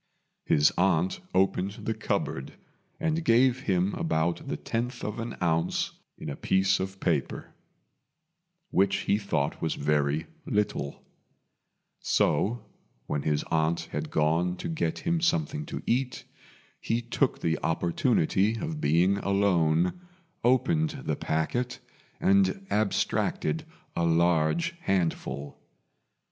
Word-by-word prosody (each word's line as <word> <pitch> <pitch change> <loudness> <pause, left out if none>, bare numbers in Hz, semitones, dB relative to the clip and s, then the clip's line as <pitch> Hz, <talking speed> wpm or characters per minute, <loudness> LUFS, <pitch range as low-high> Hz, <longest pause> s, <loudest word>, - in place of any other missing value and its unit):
His 75 0 +4
aunt 185 - +2
opened 95 +1 +1
the 110 - 0
cupboard 65 -9 -2 0.5
and 165 0 0
gave 125 0 +4
him 95 -2 +1
about 80 +1 -1
the - - -2
tenth 120 +2 -3
of 105 +2 -3
an 115 0 -5
ounce 80 -1 +1 0.3
in - - -8
a - - -5
piece 95 0 +2
of 95 +1 -4
paper, 75 -8 -1 1.2
which 95 +1 +3
he 100 - +1
thought 75 -8 -1
was 80 - 0
very 75 +1 +1 0.2
little; 105 - -1 0.9
so, 120 +4 +1 0.4
when 75 - -2
his 75 0 0
aunt 80 +1 +1
had - - -3
gone 80 +4 +1
to - - -5
get 160 0 -1
him 170 -1 0
something 75 - 0
to - - -5
eat, 125 +1 0 0.6
he 115 - 0
took 120 - 0
the 80 -1 0
opportunity 95 - +1
of 155 +3 -4
being 90 +6 +3
alone, 90 - +2 0.4
opened 150 +5 +2
the 75 - 0
packet, 120 - -1 0.4
and 195 +1 +3
abstracted 100 -6 0 0.3
a 85 - 0
large 85 - +2
handful. 80 - -2
95 Hz, 120 wpm, -28 LUFS, 80-120 Hz, 1.2 s, His